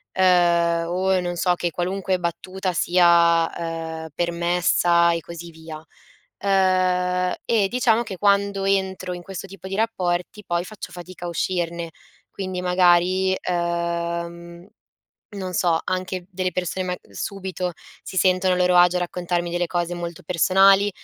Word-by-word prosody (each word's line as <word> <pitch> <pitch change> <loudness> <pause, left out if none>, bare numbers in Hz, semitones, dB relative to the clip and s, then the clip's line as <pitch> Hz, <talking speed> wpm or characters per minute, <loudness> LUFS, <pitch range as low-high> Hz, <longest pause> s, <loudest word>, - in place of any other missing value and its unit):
uhm, 170 -2 +3
o 185 +1 +1
non 175 0 -3
so 180 +1 +2
che 175 0 -2
qualunque 185 +2 -1
battuta 185 +2 -3
sia, 170 -1 +4
uhm, 165 -1 -5
permessa 170 0 +2
e 170 - -1
così 170 +1 -9
via. 160 -1 -10 0.6
Uhm, 180 -1 +2
e 215 -4 +2
diciamo 240 -2 +2
che 195 -5 -7
quando 200 0 +2
entro 190 -2 -1
in 175 - -7
questo 195 +1 -7
tipo 190 0 -10
di 195 - -3
rapporti, 195 -2 -1
poi 175 +1 -1
faccio 215 +1 -9
fatica 180 0 -10
a - - -3
uscirne. 170 -1 -2 0.4
Quindi 185 -2 -5
magari, 180 +1 +3 0.2
uhm, 170 0 -3 0.7
non 185 -2 -5
so, 170 -2 +2
anche 185 -1 -3
delle 185 0 -2
persone 180 +1 -2
mag 180 0 -3
subito 185 - -4 0.3
si 190 - -9
sentono 185 0 +3
a - - -2
loro 180 0 +2
agio 175 0 +5
a - - 0
raccontarmi 175 -1 -2
delle 175 0 0
cose 175 0 -2
molto 175 +1 -6
personali 195 +4 +4
180 Hz, 145 wpm, -23 LUFS, 170-190 Hz, 0.7 s, agio